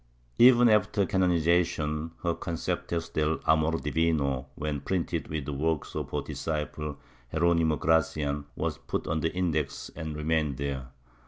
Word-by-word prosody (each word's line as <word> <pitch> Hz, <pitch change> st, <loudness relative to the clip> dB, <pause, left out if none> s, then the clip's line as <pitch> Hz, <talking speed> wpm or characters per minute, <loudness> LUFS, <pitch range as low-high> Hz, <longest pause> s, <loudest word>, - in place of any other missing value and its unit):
Even 120 Hz, 0 st, +8 dB
after 105 Hz, -2 st, +3 dB
canonization 85 Hz, -4 st, +1 dB
her 85 Hz, -1 st, +1 dB
Concepios 85 Hz, 0 st, -3 dB
del 80 Hz, +1 st, +1 dB
Amor 80 Hz, +1 st, +3 dB
divino, 75 Hz, -4 st, 0 dB
when 75 Hz, -1 st, -2 dB
printed 85 Hz, 0 st, -2 dB
with 75 Hz, -3 st, -3 dB
the 75 Hz, -, -3 dB
works 80 Hz, +2 st, -1 dB
of -, -, -3 dB
her 75 Hz, -1 st, -2 dB
disciple 75 Hz, 0 st, -4 dB, 0.3 s
Jeronimo 85 Hz, -1 st, +3 dB
Gracian, 75 Hz, -3 st, +1 dB
were -, -, -1 dB
put -, -, -4 dB
on 75 Hz, +1 st, 0 dB
the 80 Hz, +1 st, 0 dB
Index 80 Hz, -6 st, -2 dB
and 80 Hz, -2 st, -5 dB
remained 75 Hz, -2 st, 0 dB
there. 70 Hz, -2 st, -3 dB
80 Hz, 140 wpm, -28 LUFS, 75-85 Hz, 0.3 s, Even